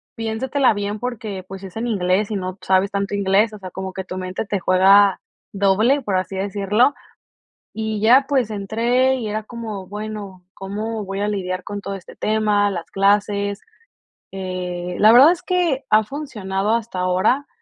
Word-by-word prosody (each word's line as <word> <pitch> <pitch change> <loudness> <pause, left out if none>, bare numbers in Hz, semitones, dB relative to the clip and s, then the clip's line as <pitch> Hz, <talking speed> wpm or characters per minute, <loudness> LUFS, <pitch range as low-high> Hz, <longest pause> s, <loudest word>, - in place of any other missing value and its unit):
"Piénsatela 245 +4 +1
bien 205 +1 -3
porque 220 -6 -5
pues 195 0 -9
es 190 +1 -9
en 230 - -2
inglés 195 0 0
y 210 - -1
no 185 -1 -4
sabes 190 +1 +2
tanto 200 0 -2
inglés", 200 +2 +2
o 210 - -9
sea, 185 - -8
como 190 0 -6
que 190 - -5
tu 185 - -6
mente 185 +3 -4
te 200 -1 -2
juega 195 +2 +5 0.3
doble, 205 +8 +3
por 200 -6 -1
así 185 +1 -3
decirlo. 205 +6 +1 0.8
Y 220 -1 -3
ya 250 +5 +6
pues 260 -6 +1
entré 235 +6 +1
y 240 -4 -4
era 215 +1 -3
como, 215 -4 -7
bueno, 205 -3 -7
¿cómo 215 +3 -4
voy 195 +1 -5
a 205 - 0
lidiar 185 -3 -3
con 205 0 -6
todo 200 - -5
este 190 - -12
tema, 210 -1 +1
las 175 -3 -6
clases? 200 0 +1 0.7
Eh, 180 -2 -5
la 215 +1 +7
verdad 270 +7 +8
es 355 0 -3
que 345 -7 0
ha 215 0 +5
funcionado 210 -6 -3
hasta 225 -5 -4
ahora, 185 +10 +1
205 Hz, 175 wpm, -21 LUFS, 190-225 Hz, 0.8 s, verdad